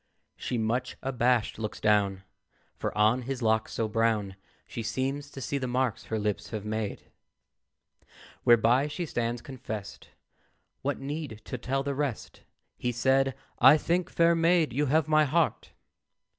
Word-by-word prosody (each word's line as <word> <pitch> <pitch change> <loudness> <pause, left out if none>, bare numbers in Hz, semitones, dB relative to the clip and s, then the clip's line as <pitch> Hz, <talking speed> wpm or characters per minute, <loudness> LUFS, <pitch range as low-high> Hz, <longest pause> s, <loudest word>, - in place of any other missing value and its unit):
She, 125 - -3
much 120 +3 -1
abashed, 125 -4 +1
looks 110 -1 -4
down, 100 -3 +2 0.5
For - - -3
on 110 +4 +4
his 130 0 -4
locks 110 0 +1
so 110 - -1
brown 110 -3 0 0.3
She - - -6
seems 135 +5 -2
to 135 - -9
see 140 +4 -2
the 130 - -2
marks 125 -2 -1
her 110 - -2
lips 105 -1 -2
have 105 -2 -5
made. 110 -1 -4 1.3
Whereby 120 +4 +5
she 170 +4 -4
stands 120 -4 -2
confest; 115 -7 -7 0.7
What 140 +1 -1
need 140 -5 -5
to 125 - -4
tell 135 +3 -1
the 140 0 -2
rest? 140 -4 -4 0.4
He 125 - 0
said, 135 +2 +2 0.2
"I 155 - +8
think, 175 +3 0
fair 170 0 +4
maid, 165 -3 +3
you 145 +3 +1
have 155 +2 +2
my 155 0 +5
heart. 160 +3 0
125 Hz, 150 wpm, -28 LUFS, 110-140 Hz, 1.3 s, I